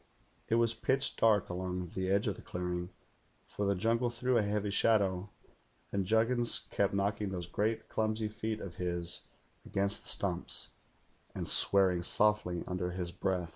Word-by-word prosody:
It 115 - +3
was 115 -1 +3
pitch 135 +3 0
dark 110 -3 +3
along 90 -1 -4
the 95 0 -2
edge 100 +1 +2
of - - 0
the - - -11
clearing, 90 0 -4 0.6
for 100 - -3
the 100 - +2
jungle 115 +5 +1
threw 125 +2 0
a 115 - +5
heavy 105 0 -1
shadow; 100 -3 +2 0.6
and 100 -2 -1
Juggins 115 +3 +3
kept 100 -1 +1
knocking 100 +1 0
those 90 -2 -4
great 110 +5 -1
clumsy 110 0 -1
feet 110 0 -4
of 95 - -6
his 85 -1 -2 0.4
against 100 +1 -1
the - - -7
stumps, - - -1 0.7
and - - -3
swearing 95 -3 +4
softly 100 -2 +2
under 90 -1 -2
his 90 -1 -4
breath. 90 -1 -1
100 Hz, 160 wpm, -32 LUFS, 90-110 Hz, 0.7 s, a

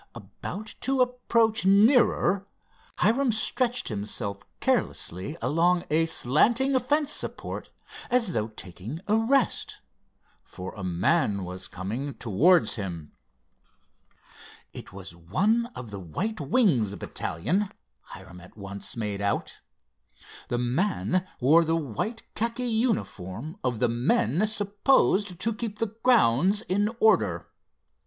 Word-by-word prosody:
About 145 - -8
to 270 0 0
approach 235 -3 +2
nearer, 200 -1 +4 0.5
Hiram 245 +4 +3
stretched 245 +3 0
himself 100 -1 -4 0.2
carelessly 95 - -1
along 175 +3 +2
a 165 +1 +3
slanting 235 - +2
fence 295 +3 0
support - - -4 0.4
as 235 -7 +2
though 110 -1 0
taking 110 - -8
a 210 - +3
rest, 245 +4 +1 0.7
for 95 0 -8
a 100 - -8
man 100 - +1
was 90 +1 -6
coming 115 +10 -5
towards 155 - +3
him. 85 -7 -6 1.6
It - - -10
was 95 -2 -9
one 200 - +1
of 120 -4 -8
the 100 - -6
"White 175 - -4
Wings" 140 - +2
battalion, 175 - -2 0.3
Hiram 95 -2 -12
at 90 +4 -16
once 100 +2 -7
made 105 -3 -3
out. 100 0 -2 0.9
The 120 - -1
man 180 +8 0
wore 155 +7 +5
the 165 0 +1
white 165 - -4
khaki 235 +3 -2
uniform 165 - -2
of 125 -3 -1
the 125 - +2
men 120 - +1
supposed 205 -2 +1
to 230 +4 0
keep 215 -1 -5
the 220 -1 -3
grounds 205 - +3
in 205 +3 +1
order. 105 - +2
165 Hz, 120 wpm, -26 LUFS, -, 1.6 s, wore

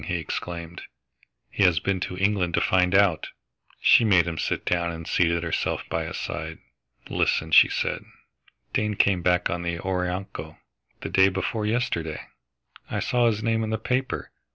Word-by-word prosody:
he 90 - -2
exclaimed. 85 +1 -5 0.7
"He - - -3
has 90 -4 +5
been 95 +2 -1
to 90 +1 -4
England 95 -3 +1
to - - +3
find 90 0 +2
out!" 95 -5 +3 0.5
She - - +6
made 95 -6 +4
him 85 -2 -4
sit - - -2
down 85 -1 0
and 80 -1 -7
seated 85 -1 +1
herself 85 - -1
by 80 0 -2
his - - -5
side. 80 +1 -5 0.5
"Listen," 80 0 0
she - - +8
said, - - -2 0.7
"Dane 105 0 0
came 95 -2 +2
back 90 0 +1
on 85 - -2
the 85 0 -3
Orinoco, 90 +1 -4 0.4
the - - -5
day 95 0 +5
before 95 +3 -2
yesterday. 85 -9 -1 0.7
I - - -2
saw 120 -1 +2
his 110 -1 0
name 115 -1 +1
in 110 - -3
the 110 - -1
paper. 130 +4 -2
90 Hz, 170 wpm, -25 LUFS, 85-105 Hz, 0.7 s, she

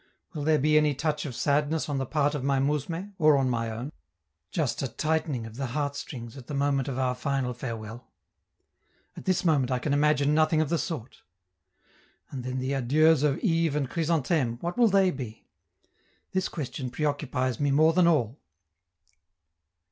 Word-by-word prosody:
Will 150 -3 -4
there 155 +1 +3
be 155 +2 +3
any 150 -2 +1
touch 150 +1 -1
of 125 - -7
sadness 150 +3 +1
on 145 -2 -1
the 135 - -3
part 145 0 +1
of 145 -3 -3
my 140 0 +1
mousme, 150 +8 -2
or 155 -2 +5
on 130 -2 +1
my 115 -1 -1
own, 120 +6 -5 0.6
just 155 -7 -1
a 135 - -1
tightening 155 -2 -1
of 115 +1 -10
the 135 -1 -2
heartstrings 140 -4 -4
at 130 -3 -11
the 145 - -4
moment 140 -1 +1
of 130 -2 -3
our 130 -1 +1
final 130 -1 -2
farewell? 115 -1 -7 1.0
At - - -10
this 185 -1 +1
moment 145 -6 +3
I 130 - +1
can 140 +3 -1
imagine 145 0 +3
nothing 155 0 +3
of 155 -2 +1
the 170 - +1
sort. 140 - -5 1.1
And 130 -3 -5
then 130 +1 -3
the 130 +1 -2
adieus 150 +4 +3
of 145 -2 0
Yves 165 -6 +2
and 145 -3 0
Chrysantheme, 155 -6 0
what 175 +4 -3
will 240 -1 +5
they 195 -2 +4
be? 120 -7 -8 0.9
This 185 0 -1
question 135 -4 -5
preoccupies 135 -4 -1
me 145 - +1
more 155 +4 +4
than 180 0 +4
all. 140 -6 +1
145 Hz, 180 wpm, -27 LUFS, 130-155 Hz, 1.1 s, or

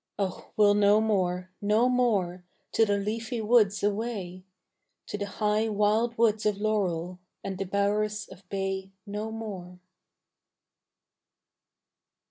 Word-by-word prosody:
Oh 195 -2 -3
we'll 205 -1 +6
no 205 +1 +5
more, 185 -4 0
no 210 +4 +3
more 205 -8 +1 0.3
To 225 - +3
the 205 0 +2
leafy 225 +3 -3
woods 215 -2 +3
away, 200 -4 -2 0.6
To - - -5
the 205 0 -3
high 210 +2 0
wild 215 +3 +1
woods 220 -2 +3
of 210 -2 +1
laurel 185 -5 -1 0.2
And 190 -1 -4
the 195 - -1
bowers 205 +2 0
of 190 0 -15
bay 195 -1 -2 0.2
no 210 +2 -4
more. 195 -5 -7
205 Hz, 120 wpm, -28 LUFS, 195-215 Hz, 0.6 s, we'll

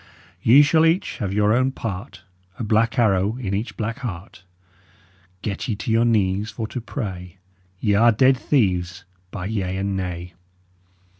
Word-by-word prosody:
Ye 135 +6 +7
shull 160 +2 +3
each 165 +3 +1
have 100 -3 -2
your 105 +1 +2
own 130 +2 +1
part, 95 -6 -6 0.3
A - - -4
blak 115 +2 +1
arrow 105 -1 +2
in 100 -7 -4
each 105 +4 -3
blak 115 +3 -3
heart. 95 -6 -7 1.0
Get 100 -2 -3
ye 110 - -1
to 105 +2 -4
your 115 +1 +3
knees 105 -2 +1
for 110 +1 -5
to 125 - -5
pray: 95 - -6 0.4
Ye 105 -1 +1
are 115 +4 +5
ded 130 +4 +4
theeves, 90 -9 0 0.3
by 90 -1 -6
yea 95 -3 -2
and 100 0 -2
nay! 90 -1 -5
105 Hz, 160 wpm, -22 LUFS, 95-115 Hz, 1.0 s, Ye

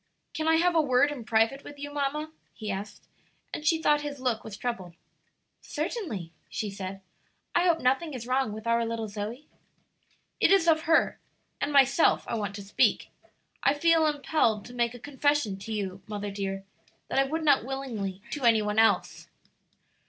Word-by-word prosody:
"Can 315 0 -2
I 320 - +5
have 350 +2 +3
a 325 - +4
word 280 0 +3
in 255 -6 -7
private 225 +4 +2
with 290 - -10
you, 290 0 -7
mamma?" 295 +2 -2 0.2
he 215 -2 -4
asked, 195 +2 -7 0.5
and - - -4
she 325 0 +4
thought 295 -2 +3
his 290 -1 -5
look 250 -4 -1
was 205 -2 -8
troubled. 190 -8 -4 0.7
"Certainly," 305 - -4 0.2
she 210 -2 -3
said. 195 0 -6 0.5
"I 345 - +3
hope 335 -2 +3
nothing 270 +4 +1
is 235 -2 -6
wrong 255 -2 +1
with 220 +1 -8
our 230 0 +2
little 230 -1 -3
Zoe?" 215 +7 -6 0.9
"It - - +4
is 385 -4 +5
of 320 0 +3
her 325 - +3 0.4
and 285 - 0
myself 275 +2 +4
I - - -3
want 205 -3 -2
to 200 - -7
speak. 195 - +2 0.5
I 275 - +3
feel 325 +1 +4
impelled 285 -7 +1
to 245 - -11
make 240 -1 0
a - - -10
confession 285 -6 0
to 210 +3 -8
you, 195 -3 -3
mother 205 -1 -4
dear, 195 -1 -4 0.5
that - - +1
I - - +5
would 315 +4 -2
not 285 -5 +5
willingly 225 -8 -4
to 295 - -4
any 225 -3 +5
one 210 +1 0
else. 225 - +2
250 Hz, 180 wpm, -28 LUFS, 210-295 Hz, 0.9 s, I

